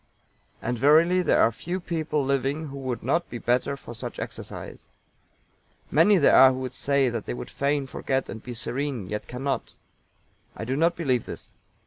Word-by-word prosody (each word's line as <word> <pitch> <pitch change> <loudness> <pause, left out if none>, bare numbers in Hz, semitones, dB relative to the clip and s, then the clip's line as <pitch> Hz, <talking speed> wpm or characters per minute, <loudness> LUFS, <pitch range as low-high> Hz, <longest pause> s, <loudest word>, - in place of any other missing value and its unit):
And 120 0 -2
verily 160 +7 +5
there - - +3
are 115 - +4
few 175 - -4
people 160 -5 -2
living 140 +3 -1
who 140 - -8
would 130 -3 -4
not 165 +8 0
be 120 - -5
the - - -14
better 125 +3 +1
for 120 - -10
such 110 - -6
exercise. - - -7 1.1
Many 180 +7 +5
there 145 - +5
are 130 0 +9
who 130 0 -3
say 140 +1 +1
that 115 -2 -5
they - - -3
would 60 - -7
fain 140 0 0
forget 135 0 -2
and 110 - -7
be 125 -1 -7
serene, 120 -3 -3
yet 105 0 -4
cannot. 135 +3 -3 0.8
I - - -5
do 130 +3 -1
not 165 +4 +2
believe 130 -9 0
this. - - -9
135 Hz, 180 wpm, -26 LUFS, 125-150 Hz, 1.1 s, are